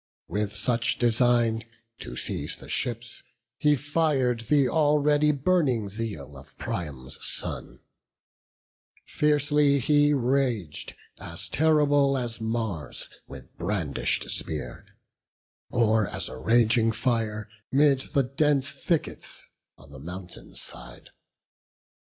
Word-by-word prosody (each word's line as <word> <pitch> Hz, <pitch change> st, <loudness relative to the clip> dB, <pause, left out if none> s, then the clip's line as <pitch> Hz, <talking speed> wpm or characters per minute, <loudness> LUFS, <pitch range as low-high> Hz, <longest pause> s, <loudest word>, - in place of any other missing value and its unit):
With 105 Hz, +2 st, -2 dB
such 115 Hz, +2 st, 0 dB
design, 120 Hz, -1 st, +3 dB, 0.4 s
to -, -, -7 dB
seize -, -, -3 dB
the -, -, -12 dB
ships, 120 Hz, 0 st, -4 dB, 0.4 s
he 150 Hz, 0 st, +4 dB
fir'd 145 Hz, -4 st, +1 dB
Th' 145 Hz, -3 st, +4 dB
already 150 Hz, 0 st, +3 dB
burning 140 Hz, -, +1 dB
zeal 100 Hz, -10 st, -5 dB
of 65 Hz, -, -15 dB
Priam's 70 Hz, -6 st, -5 dB
son; -, -, -5 dB, 1.2 s
Fiercely 145 Hz, -1 st, +3 dB
he 145 Hz, +2 st, +4 dB
rag'd, 125 Hz, -, -1 dB, 0.2 s
as 85 Hz, 0 st, -8 dB
terrible 145 Hz, -3 st, +3 dB
as 120 Hz, -2 st, -4 dB
Mars 110 Hz, -, -3 dB, 0.2 s
With 65 Hz, -3 st, -12 dB
brandish'd 85 Hz, -6 st, -1 dB
spear; 65 Hz, -6 st, -5 dB, 0.8 s
or 110 Hz, -3 st, +3 dB
as -, -, -5 dB
a -, -, -8 dB
raging 115 Hz, -, +3 dB
fire 115 Hz, -2 st, -1 dB, 0.2 s
'Mid 140 Hz, 0 st, +4 dB
the 140 Hz, +1 st, 0 dB
dense 140 Hz, +1 st, +1 dB
thickets 170 Hz, -4 st, -3 dB, 0.3 s
on 70 Hz, -, -17 dB
the 70 Hz, -, -10 dB
mountain 90 Hz, +4 st, -9 dB
side. -, -, -9 dB
120 Hz, 105 wpm, -27 LUFS, 105-145 Hz, 1.2 s, he